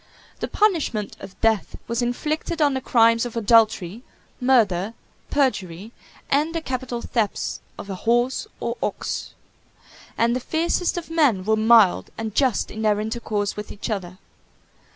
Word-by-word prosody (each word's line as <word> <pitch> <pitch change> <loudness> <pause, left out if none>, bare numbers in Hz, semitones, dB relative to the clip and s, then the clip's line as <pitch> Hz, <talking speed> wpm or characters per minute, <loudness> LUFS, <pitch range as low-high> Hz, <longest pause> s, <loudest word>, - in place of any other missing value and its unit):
The - - -2
punishment 325 - 0
of 190 - -11
death 220 -3 +1
was 235 +1 -1
inflicted 305 +7 -2
on 290 -2 +3
the 265 - -2
crimes 230 -2 +4
of 240 -1 -5
adultery, 220 -3 +3 0.4
murder, 225 -6 +2 0.3
perjury, 210 - -1 0.4
and 305 +4 +1
the 330 - -1
capital 255 -4 -4
thefts 220 -4 -2 0.2
of - - -8
a 195 - -4
horse 240 - 0
or - - -3
ox; - - -3 0.8
and 235 +1 +2
the - - 0
fiercest 335 +6 0
of 335 -1 -6
men 270 - +2
were 220 +1 +3
mild 220 -3 +5
and 220 -2 -4
just 260 -2 +1
in 220 - -6
their 210 -1 +2
intercourse 215 -2 -2
with 210 0 -6
each 205 - -5
other. 185 -3 -4
230 Hz, 150 wpm, -23 LUFS, 210-265 Hz, 0.8 s, mild